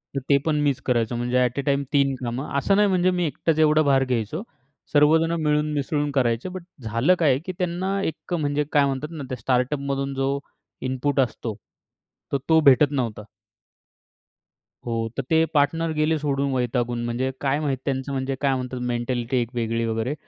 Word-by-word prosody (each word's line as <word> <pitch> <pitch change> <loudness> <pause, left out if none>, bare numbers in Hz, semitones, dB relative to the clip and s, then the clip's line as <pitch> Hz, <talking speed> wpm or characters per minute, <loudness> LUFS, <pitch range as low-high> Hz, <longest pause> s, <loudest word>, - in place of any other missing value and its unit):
तर - - +1
ते 140 - +6
पण 155 -2 +1
मीच 140 -3 +1
करायचो 120 -2 +1
म्हणजे 120 +1 0
अट 125 +2 -1
अ, - - +2
टाईम 140 -1 +1
तीन 140 -1 +3
कामं 125 +4 -3
असं 195 +7 +2
नाही 210 +1 +4
म्हणजे 185 -1 +2
मी 175 - +1
एकटाच 155 +1 -1
एवढा 155 0 +5
भार 135 -3 +3
घ्यायचो. 125 - -2 0.5
सर्वजण 160 +3 +4
मिळून 150 0 +1
मिसळून 145 +1 -1
करायचे, 125 +2 0
बट 185 -1 -7 0.2
झालं 115 +10 +2
काय 145 -6 +4
की 185 - -3
त्यांना 185 +2 -1
एक 160 +3 -4
म्हणजे 150 -3 0
काय 145 -2 +4
म्हणतात 135 +2 -2
ना 155 -4 -6
त्या 130 - -4
स्टार्टअपमधून 135 +3 -1
जो 135 +1 0 0.5
इनपुट 130 +2 -1
असतो. 115 -4 -1 0.8
तर 140 - +2
तो 160 0 +6
भेटत 140 +1 +6
नव्हता. 115 -7 -2 1.6
हो 120 - -2 0.2
तर 135 - -1
ते 160 0 +5
पार्टनर 165 +3 +2
गेले 155 +1 +1
सोडून 140 -1 0
वैतागून. 120 -1 -1
म्हणजे 125 +3 -1
काय 140 +1 +1
माहिती 135 -4 -2
त्यांचं 135 0 -2
म्हणजे 135 0 -2
काय 135 -2 +2
म्हणतात 125 0 -4
मेंटॅलिटी 120 +1 -1
एक 120 - -3
वेगळी 115 0 -1
वगैरे. 115 +4 -1
140 Hz, 180 wpm, -24 LUFS, 125-150 Hz, 1.6 s, ते